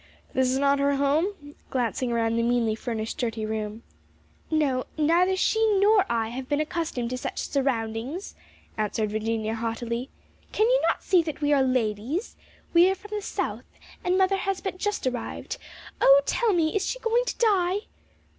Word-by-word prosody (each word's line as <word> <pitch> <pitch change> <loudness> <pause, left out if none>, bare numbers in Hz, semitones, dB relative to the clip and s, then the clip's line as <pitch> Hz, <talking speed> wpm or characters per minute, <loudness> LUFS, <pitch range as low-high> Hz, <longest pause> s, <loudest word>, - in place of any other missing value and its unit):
"This 260 -1 +2
is 260 - +1
not 280 0 +3
her 280 0 +2
home?" 290 +3 0 0.2
glancing 245 0 -1
around 230 -1 +1
the 230 - +2
meanly 235 -2 +2
furnished 220 -1 -4
dirty 225 -3 -2
room. 215 +1 -4 0.7
"No; 285 -5 +1
neither 340 +5 +3
she 445 +4 +2 0.2
nor 410 0 +4
I 225 -1 0
have 255 +2 -6
been 290 0 +1
accustomed 305 -6 -2
to 255 - -3
such - - -5
surroundings," 260 - -2 0.5
answered 215 0 -1
Virginia 220 0 -1
haughtily. 235 +2 -3 0.4
"Can 430 - +3
you - - +3
not - - -1
see 365 -3 +4
that 315 -3 -5
we 295 -1 +2
are 280 - +4
ladies? 255 - -1 0.4
We 345 +2 +7
are 385 - +1
from 410 +2 -14
the 415 - -2
South, 405 - -3 0.4
and 360 +1 +2
mother 380 +1 +3
has 385 0 -1
but 375 -1 -5
just 415 -5 -2
arrived. 250 -2 -3 0.4
Oh, 275 +1 +7
tell 470 -2 +1
me, 330 -2 +1
is 405 - +1
she - - -2
going 475 0 +1
to - - -3
die?" 390 -5 +2
275 Hz, 175 wpm, -26 LUFS, 230-365 Hz, 0.7 s, We